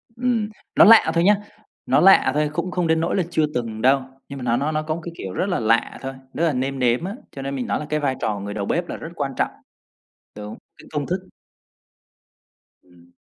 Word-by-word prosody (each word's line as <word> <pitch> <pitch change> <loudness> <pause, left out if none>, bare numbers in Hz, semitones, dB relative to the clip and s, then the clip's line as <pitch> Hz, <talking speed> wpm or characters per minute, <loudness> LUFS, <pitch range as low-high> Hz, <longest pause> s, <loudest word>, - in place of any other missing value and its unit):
Ừm, 235 -3 0 0.3
nó - - +8
lạ 220 -6 +7
thôi 170 0 +2
nhá, 205 +3 +6 0.5
nó 135 +3 +3
lạ 195 -7 +6
thôi 150 +1 +1
cũng 170 +3 -2
không 180 -2 0
đến 160 0 +2
nỗi 165 +2 0
là 190 - +2
chưa 160 -3 +2
từng 115 -3 -3
đâu. 135 +2 +4 0.3
Nhưng 140 - -7
mà - - -7
nó 120 -1 +1
nó 145 +4 -1
nó 155 0 0
có 155 0 -3
một 170 - -7
cái, 170 - -6
kiểu, 95 - -6
rất - - 0
là 180 - 0
lạ 115 +1 +1
thôi 135 0 -5 0.2
đó 165 - -1
là 165 -3 +2
nêm 135 +1 -2
nếm 125 +2 +2
á, 195 +4 -4 0.2
cho 135 - -8
nên 135 +1 -4
mình 130 - -3
nói - - 0
là 150 - -5
cái 150 - 0
vai 140 -3 0
trò 105 -2 -1
người 100 +1 -5
đầu 100 -1 -3
bếp 175 - -1
là - - -4
rất 160 - -8
quan 135 - -2
trọng. - - +1 1.1
Đúng, - - -28
cái - - -15
công - - -2
thức. - - -3 1.5
Ừm, 90 -1 -23
145 Hz, 245 wpm, -22 LUFS, 125-170 Hz, 1.5 s, nó